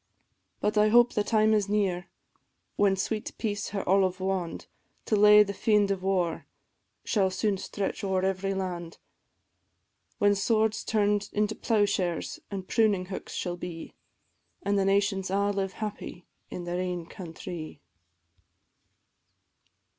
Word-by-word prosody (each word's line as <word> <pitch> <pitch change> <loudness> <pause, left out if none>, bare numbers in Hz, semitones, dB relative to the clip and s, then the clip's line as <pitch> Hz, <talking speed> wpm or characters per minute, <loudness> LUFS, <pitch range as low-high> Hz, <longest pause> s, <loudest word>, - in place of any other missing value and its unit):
But 210 0 +1
I 210 0 +5
hope 240 +2 +5
the 210 - +1
time 220 0 +3
is 205 -2 +1
near, 195 -4 0 0.7
when 200 -1 +3
sweet 215 +3 -3
peace 205 -2 -2
her 200 -1 -4
olive 185 -1 +3
wand 185 -3 -2 0.4
To 215 - +1
lay 210 0 +8
the 200 -1 -5
fiend 205 -1 +2
of 195 -2 -2
war 185 -3 -1 0.6
shall 195 -4 +2
soon 195 +1 -1
stretch 200 +1 -4
o'er 190 -1 0
every 195 +1 -1
land, 175 -3 -4 1.2
When 205 -2 +4
swords 220 +2 +1
turn'd 205 -1 +1
into 210 +1 +1
ploughshares 200 -7 0
and 190 -2 -5
pruning 200 -5 +2
hooks - - -7
shall 175 -1 -3
be, 175 -2 -7 0.7
An' 200 +1 +1
the 195 -1 +2
nations 195 -1 +1
a' 200 +1 +1
live 195 -1 -2
happy 210 -4 -6 0.2
in 180 - -6
their 175 +1 -3
ain 180 -2 -3
countrie. 165 -2 -8
195 Hz, 135 wpm, -28 LUFS, 185-210 Hz, 1.2 s, lay